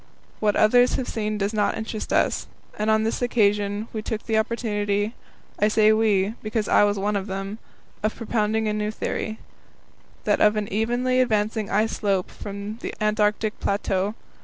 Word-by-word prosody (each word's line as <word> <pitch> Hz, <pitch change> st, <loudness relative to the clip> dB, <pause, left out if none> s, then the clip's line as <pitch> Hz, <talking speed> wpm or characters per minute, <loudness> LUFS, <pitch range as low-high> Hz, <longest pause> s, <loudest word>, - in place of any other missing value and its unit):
What 210 Hz, -1 st, +2 dB
others 245 Hz, +3 st, +5 dB
have 260 Hz, -, -2 dB
seen 215 Hz, -1 st, -2 dB
does 200 Hz, +1 st, -1 dB
not 210 Hz, -1 st, +1 dB
interest 220 Hz, -1 st, -5 dB
us, -, -, +1 dB, 0.3 s
and 215 Hz, +1 st, -1 dB
on 220 Hz, 0 st, +3 dB
this 225 Hz, +3 st, -1 dB
occasion 210 Hz, -3 st, +1 dB
we 220 Hz, -, -3 dB
took 220 Hz, 0 st, -4 dB
the 220 Hz, -, 0 dB
opportunity 210 Hz, -2 st, 0 dB, 0.5 s
I 210 Hz, -, +4 dB
say 215 Hz, 0 st, +4 dB
we, 215 Hz, -2 st, +2 dB
because 215 Hz, -1 st, -2 dB
I -, -, +5 dB
was 205 Hz, 0 st, 0 dB
one 205 Hz, +2 st, 0 dB
of 200 Hz, 0 st, -2 dB
them 195 Hz, +2 st, -5 dB, 0.4 s
of 215 Hz, +1 st, -1 dB
propounding 220 Hz, -1 st, 0 dB
a 210 Hz, -, 0 dB
new 210 Hz, 0 st, -1 dB
theory 220 Hz, 0 st, -3 dB, 0.9 s
that -, -, +1 dB
of 210 Hz, 0 st, +5 dB
an 210 Hz, -1 st, -1 dB
evenly 245 Hz, +4 st, +1 dB
advancing 215 Hz, -3 st, 0 dB
ice 215 Hz, +2 st, +2 dB
slope 195 Hz, -3 st, -1 dB
from 200 Hz, +2 st, -6 dB
the -, -, -6 dB
Antarctic 215 Hz, 0 st, +1 dB
plateau. 200 Hz, +1 st, 0 dB
215 Hz, 170 wpm, -24 LUFS, 205-220 Hz, 0.9 s, others